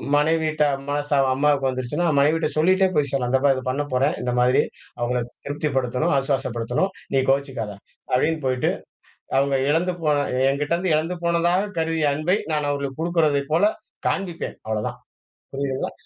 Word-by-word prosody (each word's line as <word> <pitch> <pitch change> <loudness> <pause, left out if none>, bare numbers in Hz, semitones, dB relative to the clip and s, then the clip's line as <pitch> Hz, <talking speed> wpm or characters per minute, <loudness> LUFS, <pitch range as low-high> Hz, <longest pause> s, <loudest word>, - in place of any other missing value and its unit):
மனைவியிட்ட 155 0 +2 0.2
மனஸ்தாபம் 145 -2 +1
அம்மாவுக்கு 140 -1 +2
வந்துருச்சுன்னா, 130 +7 -1
மனைவிட்ட 155 +2 +2
சொல்லிட்டே 185 +4 +4
போய் 145 -2 +2
சொல்லலாம். 125 -3 -1
"இத 130 - +3
பாரு, 135 -1 +5
இத 130 - -5
பண்ண 145 +3 -1
போறேன், 135 +4 +2
இந்த 125 0 -1
மாதிரி. 125 +1 +4 0.4
அவங்கள 125 +1 0 0.3
திருப்திப்படுத்தணும், 140 0 0
ஆசுவாசப்படுத்தணும். 135 +5 -1 0.2
நீ 135 - +4
கோவிச்சிக்காத." 135 -6 -2 0.4
அப்படீன்னு 155 +5 +1
போயிட்டு, 130 -1 +1 0.7
அவங்க 140 0 +1
இழந்து 175 +4 +1
போன 150 -2 +3 0.3
என்கிட்டேருந்து 155 +5 0
இழந்து 165 +4 -1
போனதாக 175 +4 +1
கருதிய 160 -2 +1
அன்பை 160 +7 +1 0.2
நான் 150 -1 0
அவங்களுக்கு 140 -1 -4
குடுக்குறதைப் 155 -4 +1
போல 165 - +3 0.5
காண்பிப்பேன். 180 -4 -3
அவ்வளோதான். 110 -1 -2 0.5
புரியுதுங்களா? 135 -1 -2
145 Hz, 140 wpm, -23 LUFS, 135-160 Hz, 0.7 s, பாரு